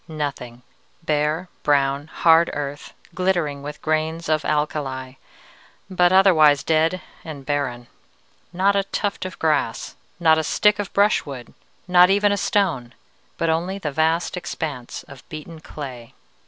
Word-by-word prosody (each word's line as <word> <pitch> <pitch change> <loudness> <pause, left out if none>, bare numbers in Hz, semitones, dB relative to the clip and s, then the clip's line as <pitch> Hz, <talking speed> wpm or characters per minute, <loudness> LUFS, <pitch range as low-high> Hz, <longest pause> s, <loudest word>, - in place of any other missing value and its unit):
Nothing. 140 -6 -5 0.4
Bare, 155 +3 0
brown, 140 0 +1
hard 165 +1 +4
earth, 145 0 -6 0.2
glittering 175 -6 0
with 145 +1 -8
grains 160 +1 -1
of 155 0 +1
alkali, 140 -4 -2 0.8
but 180 -1 +3
otherwise 160 -7 +5
dead 165 +3 +1 0.2
and 145 -4 -9
barren. 130 -4 -2 0.7
Not 190 +3 +2
a 200 - +2
tuft 200 -1 -3
of 185 - -7
grass, 150 -7 -1 0.2
not 160 -2 +4
a - - -1
stick 210 +6 +2
of 205 - -4
brushwood, 145 - 0 0.3
not 180 0 +6
even 205 +1 +3
a - - +2
stone, 165 -14 0 0.4
but 165 -1 +1
only 175 +4 -1
the 155 -7 -4
vast 160 +3 0
expanse 155 -8 -5
of 140 -2 -13
beaten 160 0 -9
clay. 130 -7 -9
155 Hz, 135 wpm, -22 LUFS, 145-180 Hz, 0.8 s, not